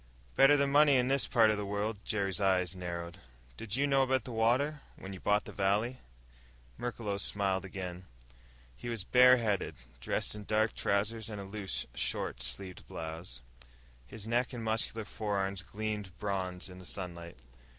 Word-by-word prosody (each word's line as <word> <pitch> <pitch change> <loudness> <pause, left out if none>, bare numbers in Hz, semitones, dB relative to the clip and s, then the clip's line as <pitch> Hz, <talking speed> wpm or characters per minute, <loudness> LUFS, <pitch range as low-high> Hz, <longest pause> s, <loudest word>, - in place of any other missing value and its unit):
"Better 135 +2 +7
than 140 -1 +2
money, 145 0 +6
in 125 0 +3
this 135 0 +2
part 115 -4 +5
of 105 - 0
the 105 - -2
world." 105 +2 -1
Jerry's 100 -3 0
eyes 95 -1 +2
narrowed. 85 -1 -5 0.4
"Did 105 - -4
you 140 +2 +2
know 135 -1 +4
about 130 0 +2
the 125 - -7
water 125 +7 +2
when 95 +1 -8
you 95 - -8
bought 105 +2 +2
the - - -7
valley?" 105 +6 +1 0.8
Merklos 105 - -3
smiled 95 -1 0
again. 90 -1 -6 0.7
He 120 - -6
was 115 -5 -2
bare 125 +4 +7
headed, 105 -5 -1 0.2
dressed - - -1
in 105 -1 -8
dark 110 +1 +2
trousers 105 +2 0
and 105 -2 -5
a - - -5
loose, 100 -1 -3
short - - -2
sleeved 95 -3 -4
blouse. 80 -5 -6 0.6
His 110 -1 -9
neck 120 +3 +1
and 120 -2 -5
muscular 110 0 -1
forearms 100 -3 -2
gleamed 105 -1 -4
bronze 95 -3 -2
in 90 -1 -10
the 90 - -11
sunlight. 85 -5 -4
105 Hz, 170 wpm, -32 LUFS, 95-115 Hz, 0.8 s, Better